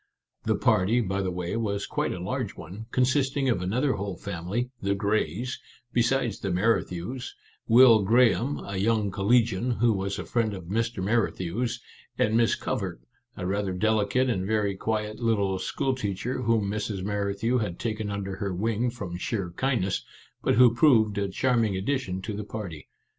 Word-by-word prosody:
The - - +2
party, 100 +6 +3
by 100 -3 -1
the 95 - -1
way, 90 +1 -3
was 100 -3 -1
quite - - -1
a - - -4
large 110 +4 -3
one, 95 +7 -9
consisting 135 +2 +1
of 95 -7 +1
another 125 +10 +1
whole 100 -2 -4
family 100 +7 -3
(the 100 0 +1
Greys) 105 - -1 0.3
besides 120 -2 +1
the 100 - -3
Merrithews, 95 +4 -1 0.3
Will 115 -2 +7
Graham, 120 +5 +3
a 100 -1 -4
young 105 0 +1
collegian 115 +3 +2
who 115 -1 +3
was 100 0 -2
a - - -5
friend 110 -4 0
of 95 - -8
Mr. 115 +2 -2
Merrithew's, 110 +1 0 0.4
and 110 +1 +2
Miss 115 -1 +3
Covert, - - -3 0.4
a 90 - -4
rather 100 0 -1
delicate 110 +5 +2
and 100 -7 0
very 105 -2 +1
quiet 110 +1 -2
little 100 -5 +1
school 135 +7 -1
teacher 125 +1 -3
whom 115 -4 +2
Mrs. 105 -2 -3
Merri 100 0 -1
thew 120 +4 +1
had 100 -6 -3
taken 110 -2 -3
under 100 -1 -4
her 100 -1 -2
wing 115 +5 0
from 100 -7 -6
sheer 95 -2 -3
kindness, 100 -3 0 0.4
but - - +2
who 120 0 +7
proved 110 -7 +4
a 100 -1 -1
charming 115 -3 +1
addition 95 -4 -2
to 110 - -4
the 105 +1 -4
party. 95 -9 -7
105 Hz, 170 wpm, -27 LUFS, 95-120 Hz, 0.4 s, Will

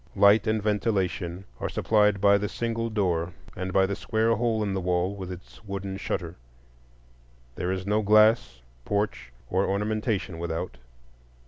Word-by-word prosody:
Light 100 +2 +5
and 110 -1 +1
ventilation 95 -4 -1
are - - -2
supplied 105 -2 +2
by 100 0 +5
the 105 0 -2
single 115 0 -2
door 90 -5 0 0.2
and 95 0 -4
by 95 +1 +4
the 100 +1 -2
square 110 +2 +1
hole 110 -1 0
in 100 -2 -1
the 95 - -1
wall 90 +1 0
with 95 -2 -6
its 90 +3 -11
wooden 100 -1 -5
shutter. 90 -3 -4 1.2
There 90 0 -2
is 95 0 -3
no 105 +2 +2
glass, 110 - +4 0.2
porch, 100 - -2 0.2
or 95 +8 +1
ornamentation 105 -3 -1
without. 85 -4 -4
100 Hz, 150 wpm, -26 LUFS, 90-110 Hz, 1.2 s, Light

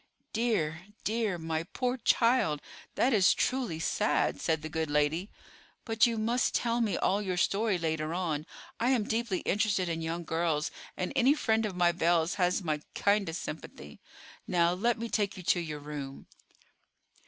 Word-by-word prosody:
"Dear, 190 -7 0 0.2
dear, 220 -4 0
my 160 -1 -2
poor 250 +9 -2
child; 230 - +3 0.4
that 260 - +3
is 195 -4 +5
truly 245 -11 -1
sad," 210 +5 +1
said 160 -2 0
the - - -3
good 160 -1 -2
lady. 150 +6 +1 0.6
"But 225 0 +4
you 230 -1 -1
must 235 +3 +1
tell 235 0 +1
me 215 -4 +1
all 200 +2 +1
your 185 -3 -2
story 200 +2 +2
later 160 -2 -2
on. 165 -4 -2 0.3
I 240 - +2
am 250 -5 +3
deeply 220 -3 -1
interested 195 -2 +1
in 165 -1 -2
young 165 +1 -3
girls, 160 -2 0 0.3
and 185 - -2
any 270 +4 +5
friend 220 -6 +1
of 195 - -6
my 175 -1 +4
Belle's 170 0 +2
has 180 +2 +2
my 155 -3 -1
kindest 200 -5 +1
sympathy. 75 - -8 0.5
Now, 170 -1 +3
let 230 +6 +1
me 230 +1 -4
take 205 -4 -1
you 185 - -8
to 175 - +3
your 155 -3 -4
room." 145 -2 -7
180 Hz, 165 wpm, -30 LUFS, 160-220 Hz, 0.6 s, is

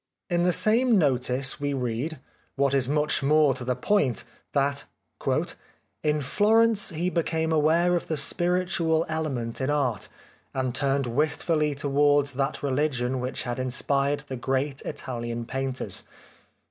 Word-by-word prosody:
In 175 0 +2
the 180 +1 +3
same 230 +5 +4
notice 135 -2 +1
we 145 0 -1
read, 125 +5 -2 0.4
what 140 0 +1
is 135 -2 +2
much 150 0 +1
more 150 0 +4
to 130 - -6
the 125 0 -1
point, 135 - +1 0.3
that 140 0 0 0.6
" - - -14
In 150 0 +1
Florence 215 - +3
he 175 +1 -2
became 160 -1 0
aware 160 +3 +3
of 175 - -2
the 160 - -2
spiritual 175 0 +1
element 135 -8 -3
in 130 - 0
art, 135 -8 0 0.5
and 130 -2 -1
turned 140 0 0
wistfully 150 +3 0
towards 145 0 +2
that 135 +2 -2
religion 130 -2 0
which 125 +1 -3
had 120 0 -4
in 130 0 -1
spired 140 +3 +1
the 135 -3 -7
great 135 +2 -1
Italian 120 -4 -4
painters. 135 +1 -3
145 Hz, 145 wpm, -26 LUFS, 130-160 Hz, 0.6 s, same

